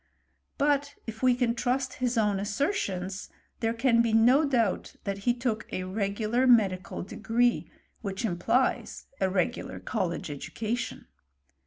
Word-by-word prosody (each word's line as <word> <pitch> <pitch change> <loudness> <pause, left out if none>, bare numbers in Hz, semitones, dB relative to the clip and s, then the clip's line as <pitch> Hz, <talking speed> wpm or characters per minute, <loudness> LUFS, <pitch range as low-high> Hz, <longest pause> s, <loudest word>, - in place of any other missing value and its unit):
But 285 0 +1
if 225 -1 -7
we 255 -1 +4
can 245 -2 +1
trust 255 +2 -1
his 250 -1 +1
own 210 -3 +2
assertions, 200 - -2 0.3
there 225 -1 +1
can 235 0 +3
he 230 -1 0
no 245 +7 +5
doubt 235 -8 0
that 200 -1 -3
he - - +5
took 235 -3 -3
a 185 - -2
regular 215 +6 0
medical 195 -9 +3
degree, 235 +5 0 0.3
which 195 +1 -3
implies 225 +7 0
a 190 - +2
regular 195 +6 -1
college 185 -5 -2
education. 220 - -4
225 Hz, 135 wpm, -28 LUFS, 195-250 Hz, 0.3 s, no